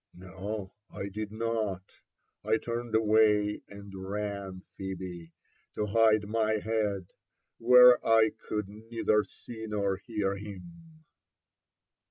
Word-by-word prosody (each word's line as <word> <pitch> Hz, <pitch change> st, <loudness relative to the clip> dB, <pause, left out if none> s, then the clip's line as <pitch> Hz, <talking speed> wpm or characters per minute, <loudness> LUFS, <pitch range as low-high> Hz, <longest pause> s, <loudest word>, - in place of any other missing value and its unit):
" -, -, -56 dB
No, 95 Hz, +2 st, -6 dB, 0.2 s
I 100 Hz, -, -6 dB
did 105 Hz, +1 st, -5 dB
not! 110 Hz, -4 st, -3 dB, 0.4 s
*I 110 Hz, -, +2 dB
turned 115 Hz, 0 st, -4 dB
away 105 Hz, -1 st, +3 dB
and 100 Hz, -1 st, -11 dB
ran, 95 Hz, -1 st, -5 dB
Phebe, 90 Hz, -3 st, -6 dB, 0.4 s
to 105 Hz, -, -1 dB
bide 110 Hz, 0 st, +3 dB
my 110 Hz, 0 st, +1 dB
head^ 105 Hz, -4 st, -2 dB, 0.5 s
where 125 Hz, +1 st, +7 dB
I 110 Hz, -1 st, +4 dB, 0.2 s
could 105 Hz, -2 st, -2 dB
neither 110 Hz, 0 st, 0 dB
see 110 Hz, 0 st, -10 dB
nor 100 Hz, -2 st, -1 dB
hear 100 Hz, -1 st, -2 dB
him." 155 Hz, -, -11 dB
105 Hz, 115 wpm, -29 LUFS, 100-110 Hz, 0.5 s, where